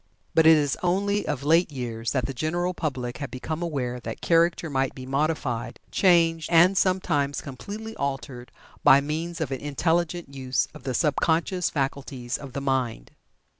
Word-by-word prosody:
But 160 0 +5
it 160 -1 +8
is 145 -3 0
only 200 +3 0
of 145 -3 -2
late 165 +3 +3
years 120 -4 -4
that 130 -4 0
the 135 - -4
general 175 +7 -1
public 130 -7 -4
have 140 -2 -4
become 155 +5 -5
aware 130 -7 -2
that - - -6
Character 170 0 +2
might 135 -3 -1
be 130 - -8
modified, 135 -3 -1
changed, 165 -3 +3
and 175 +3 +6
sometimes 165 -7 +1
completely 205 - -7
altered 135 -3 -4 0.3
by 135 - +8
means 160 +4 -3
of 160 -4 -2
an 135 - -2
intelligent 165 +2 -1
use 130 -1 -1
of 125 - -13
the 130 -2 -2
sub 150 +1 +1
conscious 170 +2 +1
faculties 135 -3 -3
of 140 -3 -9
the 140 - -3
mind. 130 - -1
145 Hz, 170 wpm, -25 LUFS, 130-170 Hz, 0.3 s, it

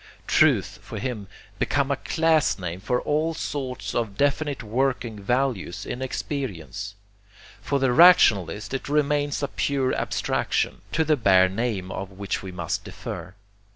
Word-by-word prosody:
Truth, 110 - +3
for 105 +2 -8
him, 105 -2 -4 0.3
becomes 140 0 +1
a - - +2
class 160 +2 +2
name 90 -2 -5
for 125 +5 0
all 155 +2 0
sorts 130 -5 -4
of 110 -4 -2
definite 145 -1 0
working 120 -2 -1
values 120 -4 -1
in 125 - -5
experience. 105 - -4 0.7
For 140 - 0
the 135 -2 +2
rationalist 105 - +5
it 135 - -4
remains 145 -1 +1
a - - +1
pure 135 -2 0
abstraction, - - -1
to 160 - +3
the 155 -1 +2
bare 95 -5 +5
name 100 -3 -2
of 95 0 -5
which 100 0 -4
we 95 - -7
must 85 -2 -3
defer. 90 +3 -7
125 Hz, 145 wpm, -25 LUFS, 100-140 Hz, 0.7 s, rationalist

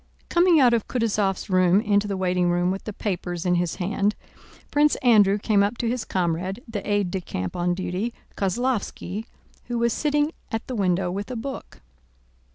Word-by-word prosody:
Coming 345 -2 +5
out 250 -3 +5
of 230 -3 0
Kutúzov's 210 -5 0
room 185 0 +4
into 205 -1 +1
the 200 -1 -2
waiting 180 -1 +1
room 175 +1 +1
with 195 - -5
the 215 - -4
papers 180 -4 -3
in 180 - +3
his 175 -1 0
hand 200 +2 0 0.6
Prince 295 +1 +4
Andrew 210 -5 +5
came 210 -1 +2
up 205 +4 0
to 235 - -1
his 240 0 -1
comrade, 185 +3 -1
the 220 -3 -4
aide 205 -3 +1
de 190 - -2
camp 90 - -5
on 175 0 0
duty, 185 +5 -2 0.2
Kozlóvski, 215 -1 -2 0.4
who 240 0 -3
was 235 -1 +2
sitting 295 0 +1 0.2
at 225 0 -3
the 255 - -5
window 185 -3 +1
with 200 +4 -4
a 250 - -4
book. 265 +4 -7
200 Hz, 180 wpm, -24 LUFS, 180-235 Hz, 0.6 s, Coming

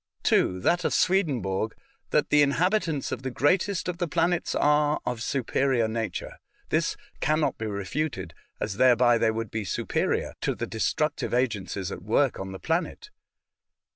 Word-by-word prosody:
(2) 90 - +2
That 175 - +2
of - - +1
Swedenborg, 125 - +1 0.3
that 150 - +2
the 150 - +6
inhabitants 160 +2 +1
of - - -3
the 130 - -3
greatest 180 +9 +1
of 175 -1 -3
the 175 - 0
planets 170 +2 0
are 150 0 +3
of 125 -2 -3
superior 130 -1 +1
nature. 110 -4 -4 0.3
This - - 0 0.2
can 155 +2 +1
not 155 - 0
be 110 - -3
refuted, 100 - -3 0.3
as 100 -2 -3
thereby 120 -1 +5
they 115 - +3
would 110 -1 -3
be 110 -1 -2
superior 95 - -1
to - - 0
the - - -3
destructive 145 +4 -1
agencies 100 -6 -1
at - - -6
work 115 +7 +1
on 95 0 -5
the 95 - -6
planet. 165 - -2
130 Hz, 160 wpm, -26 LUFS, 110-155 Hz, 0.3 s, the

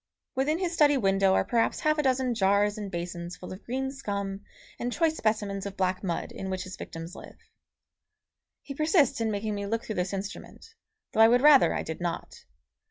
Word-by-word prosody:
Within 285 +5 +1
his 350 -1 -2
study 295 -3 +4
window 195 -3 +3
are - - +2
perhaps 230 -1 +1
half 305 0 +2
a - - +5
dozen 260 -2 +1
jars 205 -1 +2
and 210 -2 -5
basins 175 -1 -5
full 180 - -8
of 185 - -11
green 265 +2 -2
scum 200 -7 -4 0.4
and 245 - -2
choice 320 +3 +1
specimens 205 -5 -1
of 200 - -9
black 185 0 0
mud 175 -3 -3
in 190 - -6
which 185 -1 -3
his 185 0 -8
victims 165 +2 -8
live. - - -11 1.3
He 280 - -7
persists 305 -3 +2
in 225 - +1
making 210 0 -2
me 200 0 -4
look 230 +2 -1
through 220 - -4
this 180 - -3
instrument, 200 - -7 0.4
though 220 - +2
I 225 - +9
would 245 +2 +4
rather 290 -1 +7
I - - -2
did 160 +1 -6
not. 175 -1 -5
210 Hz, 200 wpm, -28 LUFS, 190-265 Hz, 1.3 s, I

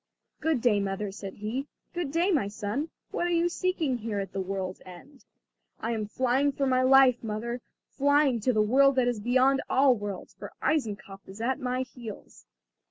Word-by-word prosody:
"Good 315 -6 0
day, 225 -4 +3
mother," 195 +1 -2
said 195 -1 -8
he. 235 +7 -4 0.3
"Good 345 -5 -3
day, 340 +5 +2
my 285 - +2
son! 215 +9 -3 0.2
What 350 - -1
are - - -1
you 340 0 +2
seeking 340 -7 -1
here 215 -2 -3
at 195 - -5
the 195 - -2
world's 190 -1 -4
end?" 215 +10 -14 0.5
"I 230 - -2
am 215 -2 -2
flying 260 +5 +1
for 275 - 0
my 255 -1 +3
life, 260 -2 +5
mother, 230 +3 -4 0.3
flying 285 -3 +2
to 255 +4 +1
the 215 -3 +3
world 275 +5 +4
that 255 -2 +3
is 240 -3 0
beyond 255 +4 +3
all 265 0 +5
worlds, 205 -3 -6
for - - -10
Eisenkopf 205 -9 -2
is 195 +3 -10
at 255 +4 -1
my 255 -1 -1
heels." 240 -4 -11
245 Hz, 185 wpm, -28 LUFS, 210-275 Hz, 0.5 s, life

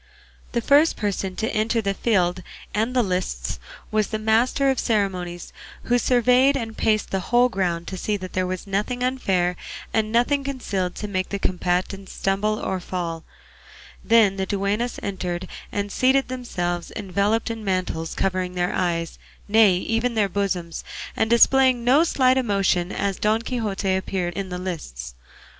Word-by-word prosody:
The 235 - +1
first 290 +6 +4
person 195 -3 -2
to 220 - -2
enter 225 +1 +1
the 200 -3 0
field 185 -4 +1 0.3
and 225 +4 0
the 250 - +4
lists 125 - -2 0.3
was 215 -1 +1
the 220 - -2
master 230 +5 +2
of 265 - -2
the - - -1
ceremonies, 185 -5 -1 0.3
who 245 0 +2
surveyed 250 +3 +4
and 225 -3 -5
paced 215 -2 +1
the 195 - 0
whole 245 +1 +5
ground 175 -5 -1
to 190 - -5
see 210 +3 -1
that 185 -1 -8
there 185 0 0
was 185 0 -4
nothing 210 +6 -2
unfair 190 -9 +1 0.4
and 215 -1 +1
nothing 245 +5 +2
concealed 200 -10 -3
to 210 - -5
make 185 -2 -2
the 200 - -2
combatants 185 +1 -2
stumble 205 +2 0
or 190 -2 -2
fall; 170 -2 -4 0.8
then 220 -4 +4
the 190 0 -2
duennas 205 +4 -1
entered 185 -2 -3 0.2
and 205 0 -2
seated 265 +3 +2
themselves, 175 -9 -3
enveloped 205 +3 0
in 225 -1 -6
mantles 185 -4 -2
covering 185 -1 -1
their 175 0 0
eyes, 170 -2 -1 0.3
nay 210 -3 +5
even 230 +6 -1
their 210 -2 +3
bosoms, 185 -4 -2 0.3
and 220 - +1
displaying 255 +1 +5
no 265 +6 +5
slight 260 -5 +3
emotion 195 -6 +1
as 200 -1 -2
Don 215 +2 +1
Quixote 210 -6 -1
appeared 185 -2 -2
in 195 -1 -4
the 180 - -4
lists. 65 - -6
200 Hz, 160 wpm, -23 LUFS, 185-230 Hz, 0.8 s, whole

